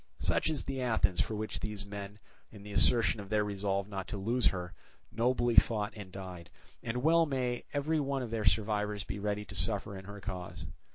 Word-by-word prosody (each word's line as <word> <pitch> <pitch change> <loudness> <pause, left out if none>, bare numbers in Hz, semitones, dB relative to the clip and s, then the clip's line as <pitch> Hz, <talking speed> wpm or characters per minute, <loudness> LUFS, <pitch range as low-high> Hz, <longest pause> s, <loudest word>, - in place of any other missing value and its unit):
Such - - +1
is 155 -4 -2
the 135 -1 -3
Athens 110 -7 +2
for 110 - -2
which 110 +1 -3
these 105 -1 -4
men, 100 0 -7 0.3
in 105 -2 -12
the 105 - -8
assertion 115 +1 +4
of 100 -1 -8
their 105 -1 +3
resolve 100 -1 -1
not 95 -3 -5
to 105 - -4
lose 115 +5 +2
her, 90 -2 -2 0.4
nobly 120 0 +2
fought 105 -2 +4
and 100 -3 -8
died; 90 -3 -8 0.3
and 125 +2 -2
well 165 +1 +5
may 125 -3 -1
every 150 +2 +1
one 140 -2 0
of 115 - -5
their 110 -2 -1
survivors 105 0 +1
be 100 - -5
ready 105 0 -1
to - - -9
suffer 100 +3 0
in 95 0 -8
her 100 +1 -8
cause. 90 -4 -6
105 Hz, 205 wpm, -32 LUFS, 100-120 Hz, 0.4 s, well